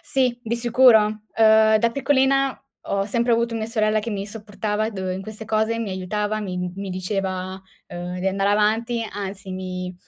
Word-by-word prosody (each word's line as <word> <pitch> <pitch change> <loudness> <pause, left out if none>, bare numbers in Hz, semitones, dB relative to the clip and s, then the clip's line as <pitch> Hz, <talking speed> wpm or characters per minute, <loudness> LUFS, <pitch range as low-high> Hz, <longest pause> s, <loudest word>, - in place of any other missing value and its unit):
Sì, 255 -3 0
di 235 +1 -2
sicuro. 240 -1 +6 0.4
Uhm, 220 0 +6
da 230 +2 +2
piccolina, 270 -1 +2 0.3
ho 195 0 0
sempre 235 +3 +1
avuto 230 0 +1
mia 220 -1 -2
sorella 215 -1 +1
che 225 +2 -5
mi 200 -1 -3
supportava 215 0 -3
dov 190 -3 -4
in 190 - -4
queste 215 +2 -8
cose, 220 +1 0
mi 220 -4 -3
aiutava, 210 +3 -2
mi 185 -3 -4 0.2
mi 195 0 -6
diceva, 185 0 -3 0.3
uhm, 175 +1 -6
di 190 - -2
andare 195 +1 +1
avanti, 225 +3 +1
anzi, 195 -1 -6
mi 185 -1 -5
215 Hz, 175 wpm, -23 LUFS, 195-230 Hz, 0.4 s, sicuro